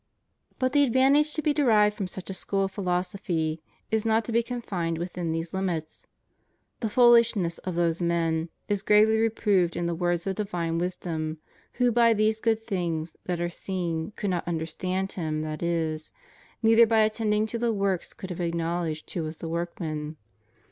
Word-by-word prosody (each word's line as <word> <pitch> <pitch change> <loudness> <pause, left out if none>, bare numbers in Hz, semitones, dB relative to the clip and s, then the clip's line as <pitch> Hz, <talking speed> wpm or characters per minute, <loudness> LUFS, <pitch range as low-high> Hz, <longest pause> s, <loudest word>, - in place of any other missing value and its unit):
But 255 0 0
the 290 -1 +5
advantage 275 +4 +4
to 310 - -2
be 300 - +2
derived 215 -8 +4
from 195 -3 -3
such 190 +1 -7
a - - -4
school 195 +1 -1
of 195 - -2
philosophy 180 -4 -2 0.3
is 220 -1 +1
not 225 0 +2
to 235 - -4
be 230 +1 +3
confined 195 -9 -3
within 175 -1 -3
these 165 +1 -3
limits. 175 -5 -3 0.7
The 225 - -1
foolishness 230 -7 +4
of 185 -2 -5
those 170 0 +1
men 165 -1 0 0.2
is 205 -1 0
gravely 215 +1 +5
reproved 205 -6 +2
in 175 - -1
the 170 - 0
words 175 0 -1
of 195 - 0
divine 175 -6 -2
wisdom 165 -3 -3 0.4
who 245 -1 +2
by 230 -1 +4
these 215 +1 +2
good 225 -1 +1
things 170 -7 -3
that 175 -1 -2
are 175 - 0
seen 175 -2 -3
could 205 -2 -2
not 175 -2 -2
understand 180 +3 -2
Him 155 -3 -2
that 155 -1 -5
is, 160 -2 -1 0.5
neither 225 +1 +6
by 220 -1 +4
attending 215 0 +1
to 230 +1 -4
the 235 0 +1
works 195 -4 -1
could 190 - -7
have 180 - -4
acknowledged 170 -1 -2
who 175 - -1
was 155 0 -5
the 165 - -6
workman. 160 -2 -4
185 Hz, 175 wpm, -27 LUFS, 165-220 Hz, 0.7 s, neither